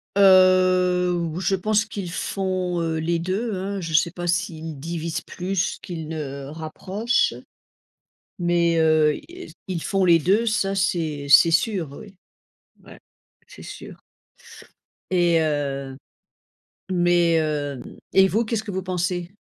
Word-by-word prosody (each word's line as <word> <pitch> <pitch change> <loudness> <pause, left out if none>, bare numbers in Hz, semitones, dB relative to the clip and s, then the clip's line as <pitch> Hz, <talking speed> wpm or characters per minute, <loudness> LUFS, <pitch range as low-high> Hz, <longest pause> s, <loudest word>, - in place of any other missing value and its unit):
Heu, 185 -2 +5
ou 170 -1 -2
je 195 +1 +1
pense 215 +3 +1
qu'ils 200 -5 -6
font, 185 -1 -2
heu, 165 -1 -1
les 170 +2 0
deux, 195 +6 -2
hein. 195 +1 -4
Je 165 -1 -5
sais 170 +2 +3
pas 175 0 -6
s'ils 165 -5 -2
divisent 165 +1 -4
plus 185 0 -3
qu'ils 160 -3 -7
ne 140 -3 -6
rapprochent, 185 - -1 1.1
mais, 170 -1 +2
heu, 155 -1 +4
yes, 360 +1 -11
ils 180 -4 -4
font 195 -1 0
les 170 -2 +6
deux, 200 +9 +2
ça, 195 -3 0
c'est 160 -6 -1
c'est 150 +4 +7
sûr, 175 -1 0
oui, 195 +6 -12 0.7
ouais, - - -14 0.5
c'est - - -13
sûr. - - -10 1.1
Et 175 -2 +3
heu, 140 -3 -2 0.9
mais, 175 -2 +3
hem 145 -4 -3 0.2
et 190 0 +5
vous, 220 +5 +1
qu'est-ce 220 -1 -2
que 210 - -6
vous 190 0 -3
pensez? 180 0 -3
175 Hz, 135 wpm, -23 LUFS, 160-190 Hz, 1.1 s, c'est